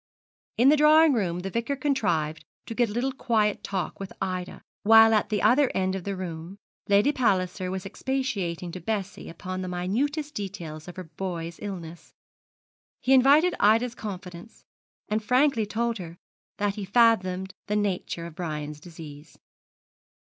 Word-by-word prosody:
In 250 +4 +6
the 300 - +5
drawing 305 +1 +6
room 180 -7 -1
the 195 +1 -5
Vicar 235 +6 -1
contrived 185 - -1 0.2
to - - -6
get 240 -1 +1
a - - -6
little 245 +5 -1
quiet 220 -5 0
talk 190 -2 -3
with 195 -1 -6
Ida, 185 -1 -4 0.2
while 225 +1 +7
at 215 - +2
the 210 -2 -1
other 270 +1 +5
end 190 0 +1
of 190 -2 -5
the 200 -1 -2
room 175 0 -6 0.3
Lady 205 +8 +4
Palliser 190 -8 0
was 190 +1 -4
expatiating 195 -8 -3
to 185 - -7
Bessie 200 +1 -4
upon 185 +2 -6
the 185 - -4
minutest 270 - -2
details 175 - -6
of 180 - -9
her 185 - -6
boy's 170 0 -6
illness. 175 -5 -8 0.8
He 265 - +2
invited 285 +7 +6
Ida's 230 +3 +3
confidence, 190 -2 -9 0.4
and 215 +1 -1
frankly 250 -1 +2
told 230 +1 -1
her 170 -1 -8 0.4
that 205 -1 0
he 205 -1 -5
had 190 - -24
fathomed 190 -5 +3
the 210 - -1
nature 190 -4 -2
of 170 - -8
Brian's 150 -3 -5
disease. 155 -2 -12
200 Hz, 160 wpm, -26 LUFS, 180-235 Hz, 0.8 s, while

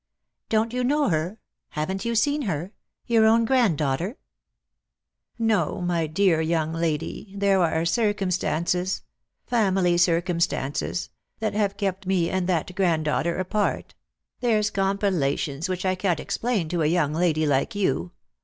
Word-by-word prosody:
" - - -58
Don't 225 +1 +1
you 250 0 0
know 290 +2 +2
her? 165 +5 -1 0.3
haven't 190 +7 -3
you 235 0 -1
seen 285 +7 +2
her? 180 - -3 0.3
your 225 -2 +4
own 230 +1 +4
granddaughter! 185 - +1 0.4
" - - -60
" - - -62 0.2
No, 225 -2 +1
my 175 -2 0
dear 165 0 +2
young 160 -1 0
lady, 165 +4 -3
there 195 -1 +3
are 160 0 +1
circumstances 185 -3 0 0.2
— - - -58
family 190 -7 +2
circumstances 170 -2 0
— - - -49
that 215 -2 -1
have 205 -1 0
kept 195 -2 -2
me 180 -3 +1
and 185 -1 -1
that 180 +1 0
granddaughter 170 -2 +1
apart; 200 +3 -1 0.5
there's 215 -4 +1
compilations 185 -6 0
which 185 0 -3
I 185 - +2
can't 185 -3 0
explain 225 -8 -1
to 175 -1 -1
a 150 - +3
young 155 -3 +1
lady 160 -2 +1
like 140 +5 +1
you. 130 - 0
185 Hz, 150 wpm, -25 LUFS, 165-210 Hz, 0.5 s, your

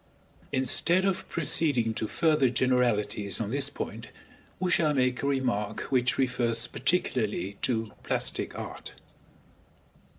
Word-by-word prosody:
Instead 170 +8 +3
of 190 -1 -1
proceeding 140 -8 +1
to 110 - -3
further 150 -1 +2
generalities 115 -6 0
on 110 -2 -3
this 140 +1 +1
point, - - -6 0.5
we 185 0 0
shall 155 -3 +3
make 130 -1 +1
a 140 - -1
remark 125 -7 -1
which 130 0 +2
refers 120 -3 +1
particularly 110 - -1
to 110 -3 -1
plastic - - -2
art. - - -8
125 Hz, 120 wpm, -28 LUFS, 115-145 Hz, 0.5 s, Instead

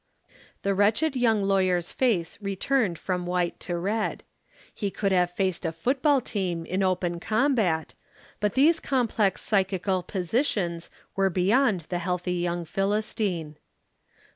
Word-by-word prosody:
The 200 - +1
wretched 215 +10 +2
young 225 -5 +2
lawyer's 185 -3 +1
face 195 -10 0
returned 200 0 0
from 180 0 -3
white 180 -1 -1
to 175 -1 -3
red. 205 +5 -2 0.5
He 205 - -2
could 195 0 -1
have 180 -2 +3
faced 185 0 -1
a 165 - -1
football 265 - +2
team 180 -7 -2
in 185 +3 -1
open 180 -2 0
combat, 215 - +1 0.5
but 210 -1 0
these 315 +5 +5
complex 230 -7 0
psychical 190 -2 +1
positions 180 - -1 0.3
were 195 0 +2
beyond 195 +3 +2
the 175 - -1
healthy 180 0 -2
young 175 -1 -2
Philistine. 195 -4 -1
190 Hz, 130 wpm, -26 LUFS, 175-215 Hz, 0.5 s, these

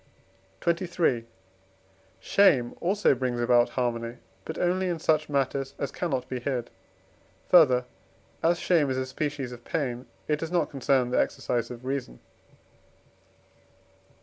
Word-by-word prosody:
XXIII. 170 -9 +1 0.9
Shame 135 -12 +3
also 200 +1 +3
brings 125 -2 -2
about 120 0 +4
harmony, 120 -1 -1 0.3
but - - -5
only 185 +1 +1
in 175 - -1
such 155 -1 +1
matters 135 -1 -1
as 140 - -3
cannot 135 -8 -2
be 130 - -4
hid. 125 -2 -3 0.8
Further, 130 -8 +6 0.6
as 170 +2 +3
shame 165 -5 +2
is 130 - -1
a 130 - -1
species 140 -1 -3
of 120 -1 -10
pain, 125 -5 -3 0.2
it 150 -1 +1
does 165 - -4
not 175 - +1
concern 135 -3 +1
the - - +2
exercise 120 -2 -2
of 125 +1 -9
reason. 130 - -4
135 Hz, 130 wpm, -27 LUFS, 125-160 Hz, 0.9 s, Further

